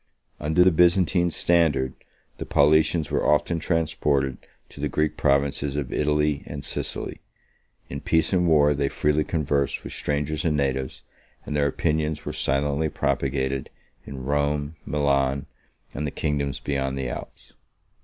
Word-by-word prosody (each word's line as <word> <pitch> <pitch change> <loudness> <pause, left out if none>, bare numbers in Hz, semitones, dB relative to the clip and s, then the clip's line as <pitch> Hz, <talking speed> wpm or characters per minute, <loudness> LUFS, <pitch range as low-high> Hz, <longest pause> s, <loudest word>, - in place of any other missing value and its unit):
Under 80 +4 +3
the 95 - +5
Byzantine 90 +1 +3
standard, 80 -5 +2 0.5
the - - -4
Paulicians 80 +2 +3
were - - +1
often 80 +3 +2
transported 75 -5 0 0.3
to - - -14
the - - -1
Greek 75 0 0
provinces 70 -1 +1
of 70 -3 -3
Italy 75 -1 +1
and 70 -1 -6
Sicily: - - -3 0.7
in 70 +1 -6
peace 80 +3 +1
and 90 -1 +3
war, 75 -2 +5
they 70 0 0
freely 75 +2 +1
conversed 70 -3 -1
with - - -7
strangers 75 +1 -2
and 75 -3 +1
natives, 65 -2 -2 0.4
and 75 - -4
their 70 -1 +2
opinions 75 +1 -1
were - - -4
silently 70 +3 0
propagated 65 -1 -1 0.3
in 65 -2 -8
Rome, 75 +1 0
Milan, 70 -2 +1 0.5
and 75 +2 -3
the - - 0
kingdoms 70 -2 -2
beyond 70 -1 -2
the 65 -1 -2
Alps. - - -8
75 Hz, 145 wpm, -25 LUFS, 70-80 Hz, 0.7 s, the